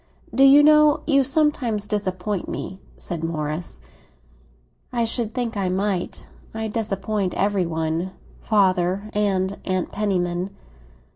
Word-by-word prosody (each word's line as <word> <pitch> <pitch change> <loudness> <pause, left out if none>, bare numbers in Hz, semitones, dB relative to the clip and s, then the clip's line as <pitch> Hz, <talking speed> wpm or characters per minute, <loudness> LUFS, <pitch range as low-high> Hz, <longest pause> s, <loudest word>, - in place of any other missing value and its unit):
"Do 270 - +4
you 280 +2 +8
know 300 0 +6
you 275 -3 +4
sometimes 265 -7 +1
disappoint 195 -2 -2
me?" 190 - -5 0.2
said 170 -2 -5
Morris. 155 - -3 1.1
"I 235 -2 +1
should 225 -1 -1
think 240 -3 -2
I 195 -2 0
might. 190 -1 -2 0.3
I 220 0 -2
disappoint 210 -3 -2
every 195 -2 +1
one—father 185 +4 -1
and 200 -2 0
Aunt 185 -1 -2
Penniman." 180 -3 -1
200 Hz, 115 wpm, -23 LUFS, 180-225 Hz, 1.1 s, you